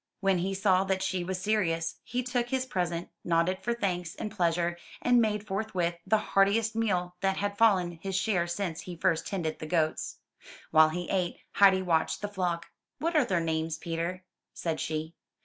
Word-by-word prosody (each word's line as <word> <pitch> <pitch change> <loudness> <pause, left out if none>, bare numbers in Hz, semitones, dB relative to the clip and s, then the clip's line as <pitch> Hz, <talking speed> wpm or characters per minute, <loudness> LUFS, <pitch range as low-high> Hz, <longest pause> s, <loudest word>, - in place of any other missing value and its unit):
When 195 -2 +2
he 195 +2 -1
saw 190 -1 +3
that 190 0 0
she 185 -1 -1
was 185 +1 -3
serious, 165 -5 0
he 250 +1 -2
took 245 -1 -1
his 260 0 0
present, 175 -6 -2
nodded 170 +2 +1
for 240 - -1
thanks 180 -5 -2
and 210 - -5
pleasure, 175 -2 0 0.2
and 245 -1 +4
made 210 -2 0
forthwith 190 -4 -2
the 220 - +4
heartiest 210 +2 +2
meal 180 -6 0
that 195 0 +1
had 205 0 -1
fallen 185 -6 +3
his 195 0 -3
share 190 -3 +1
since 175 -2 -3
he 175 +2 -7
first 170 -1 +1
tended 170 -6 -2
the 155 - -6
goats. 160 -1 0 0.5
While 155 0 +7
he 175 +2 -4
ate, 180 -3 0
Heidi 190 -2 +5
watched 170 +2 +1
the - - 0
flock. 180 -4 -2 0.3
What 335 +2 -1
are 300 -4 +5
their 180 -5 +1
names, 160 -1 -1
Peter?'' 170 +3 -3 0.3
said 165 -2 -2
she. 155 +1 -3
185 Hz, 185 wpm, -29 LUFS, 170-205 Hz, 0.5 s, While